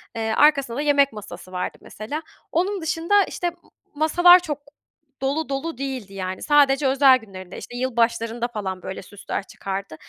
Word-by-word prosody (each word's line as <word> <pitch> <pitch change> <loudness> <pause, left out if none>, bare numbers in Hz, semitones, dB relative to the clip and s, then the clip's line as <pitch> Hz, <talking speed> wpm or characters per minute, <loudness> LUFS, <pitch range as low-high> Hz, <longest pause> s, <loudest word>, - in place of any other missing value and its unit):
Eee, 220 -1 -1
arkasında 280 -5 +4
da - - 0
yemek 280 -4 +3
masası 205 -3 -10
vardı 180 -1 -4
mesela. 285 +10 -6 0.3
Onun 370 +3 0
dışında, 335 +6 +2
işte, 355 - -3
m 340 - -15 0.4
masalar 350 +4 +6
çok 300 -5 -4 0.6
dolu 280 +3 -1
dolu 275 +1 -3
değildi 260 -8 -5
yani. 185 -1 -5
Sadece 285 -2 +4
özel 265 -1 +6
günlerinde, 190 -5 -11
işte, 245 - -8
yılbaşlarında 235 -1 0
falan 190 -5 -5
böyle 190 - -6
süsler 200 +1 -6
çıkardı. 195 -3 -6
265 Hz, 155 wpm, -23 LUFS, 210-300 Hz, 0.6 s, masalar